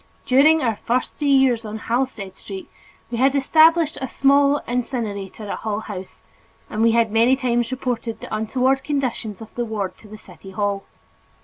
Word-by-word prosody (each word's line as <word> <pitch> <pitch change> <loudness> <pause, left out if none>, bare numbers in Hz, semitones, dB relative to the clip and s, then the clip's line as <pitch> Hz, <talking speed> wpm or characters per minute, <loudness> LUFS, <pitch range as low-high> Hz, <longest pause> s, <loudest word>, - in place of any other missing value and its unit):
During 300 +4 +5
our 225 -4 0
first 245 +2 -1
three 295 - -1
years 265 -4 +4
on 215 0 -6
Halsted 230 -5 -2
Street, 195 -2 -8 0.4
we 235 - -2
had 270 +2 +3
established 315 +3 +4
a 265 - -2
small 280 +2 +3
incinerator 220 -5 -3
at - - -4
Hull 215 -1 -3
House 190 -4 -9 0.5
and 215 - -2
we 230 0 +4
had 230 -2 +2
many 230 +4 +4
times 240 -3 0
reported 245 -3 -3
the - - -5
untoward 260 +5 +1
conditions 250 -8 -3
of 220 - -11
the 240 - -2
ward 215 -4 -3
to 215 - -15
the 215 +1 -10
city 185 -2 -14
hall. 200 0 -2
235 Hz, 175 wpm, -22 LUFS, 215-265 Hz, 0.5 s, During